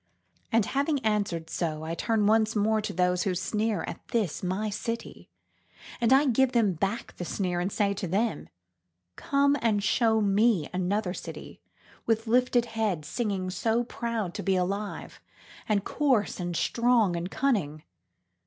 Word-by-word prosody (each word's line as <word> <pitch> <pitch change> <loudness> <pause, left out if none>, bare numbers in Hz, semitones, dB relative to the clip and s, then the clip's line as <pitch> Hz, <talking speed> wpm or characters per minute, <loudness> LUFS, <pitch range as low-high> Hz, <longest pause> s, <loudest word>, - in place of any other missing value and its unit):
And 225 -2 +3
having 285 +2 0
answered 200 -6 0
so 160 -3 -3
I 160 +1 -3
turn 220 +4 0
once 220 +1 +3
more 215 +1 +2
to 210 - -4
those 180 0 +1
who 190 -3 0
sneer 215 +3 -1
at - - -6
this 215 -9 -1
my 190 +4 -2
city, 230 +3 -5 0.7
and 235 0 +2
I 270 +3 +6
give 260 0 +2
them 220 -6 +3
back 195 +7 -3
the - - -4
sneer 180 0 -2
and 180 +3 -1
say 200 -2 +1
to 200 -1 -4
them:Come 90 - -2
and 210 -3 +1
show 220 +1 +3
me 205 -4 +2
another 185 +1 -1
city - - -9 0.5
with 225 0 +1
lifted 245 +1 +3
head 220 -9 -2
singing 195 0 -2
so 225 +5 0
proud 230 -6 -3
to - - -4
be 195 -1 +1
alive 195 +3 -3 0.5
and 205 -2 +2
coarse 260 -10 +1
and 175 -1 -3
strong 235 -6 +2
and 170 +1 -3
cunning. 185 - -1
210 Hz, 155 wpm, -27 LUFS, 180-230 Hz, 0.7 s, I